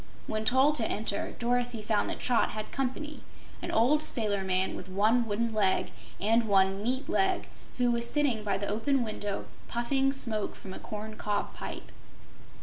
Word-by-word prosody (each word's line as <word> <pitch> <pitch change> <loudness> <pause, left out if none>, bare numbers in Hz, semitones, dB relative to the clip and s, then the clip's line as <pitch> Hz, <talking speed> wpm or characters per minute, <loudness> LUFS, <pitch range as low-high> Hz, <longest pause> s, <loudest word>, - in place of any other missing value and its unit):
When 215 0 -2
told 265 +6 +5
to 225 - +1
enter, 205 -1 -2
Dorothy 245 -1 0
found 215 -1 +1
that - - -3
Trot 245 -2 +2
had 215 0 -5
company, 275 +3 -3 0.4
an - - -4
old 260 +7 +3
sailor 210 -9 +1
man 185 0 +1
with 185 - -8
one 220 +5 +3
wooden 225 +2 -1
leg 200 -3 +2 0.3
and 225 +3 +3
one 195 -1 +3
meat 255 +5 0
leg, 380 -2 +1 0.3
who 245 -1 +3
was 235 0 +1
sitting 275 -8 +1
by 200 -2 0
the 200 - -3
open 250 +5 +1
window 205 -2 -4 0.2
puffing 270 +3 +1
smoke 230 -6 -1
from 190 - -9
a - - -7
corn 215 0 -7
cob 205 -2 -2
pipe. - - -7
225 Hz, 170 wpm, -29 LUFS, 205-250 Hz, 0.4 s, told